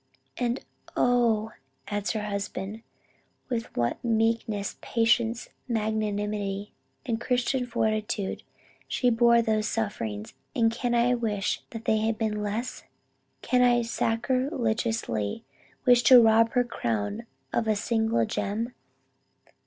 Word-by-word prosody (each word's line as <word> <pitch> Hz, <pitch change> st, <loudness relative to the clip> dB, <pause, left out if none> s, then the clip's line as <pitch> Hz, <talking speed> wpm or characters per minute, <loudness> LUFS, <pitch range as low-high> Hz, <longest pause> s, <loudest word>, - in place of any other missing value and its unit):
"And 245 Hz, +1 st, -2 dB, 0.3 s
oh!" 230 Hz, -3 st, +2 dB, 0.4 s
adds 205 Hz, 0 st, -2 dB
her 215 Hz, -2 st, -2 dB
husband, 200 Hz, +1 st, -4 dB, 0.7 s
"With 235 Hz, -2 st, -4 dB
what 120 Hz, 0 st, 0 dB
meekness, 225 Hz, -3 st, 0 dB
patience 230 Hz, 0 st, +1 dB, 0.2 s
magnanimity 210 Hz, -3 st, -2 dB, 0.3 s
and 230 Hz, -2 st, -2 dB
Christian 250 Hz, +1 st, 0 dB
fortitude, 215 Hz, -4 st, -1 dB, 0.5 s
she 250 Hz, -1 st, +1 dB
bore 235 Hz, 0 st, +5 dB
those 215 Hz, -1 st, +1 dB
sufferings; 115 Hz, -, -3 dB, 0.2 s
and 225 Hz, -1 st, +3 dB
can 240 Hz, +1 st, -1 dB
I 240 Hz, +1 st, +3 dB
wish 215 Hz, -4 st, -1 dB
they 225 Hz, -1 st, 0 dB
had 220 Hz, 0 st, 0 dB
been 215 Hz, -2 st, -1 dB
less? 210 Hz, +4 st, -3 dB, 0.6 s
Can 250 Hz, -1 st, +2 dB
I 240 Hz, -1 st, +4 dB
sacriligiously 230 Hz, -, -1 dB, 0.4 s
wish 245 Hz, -1 st, +6 dB
to 255 Hz, +1 st, +10 dB
rob 225 Hz, 0 st, +5 dB
her 250 Hz, -1 st, +4 dB
crown 110 Hz, -, -3 dB, 0.3 s
of 225 Hz, -, 0 dB
a 215 Hz, -, +3 dB
single 220 Hz, -, +1 dB
gem? 225 Hz, -, -2 dB
225 Hz, 115 wpm, -27 LUFS, 210-235 Hz, 0.7 s, to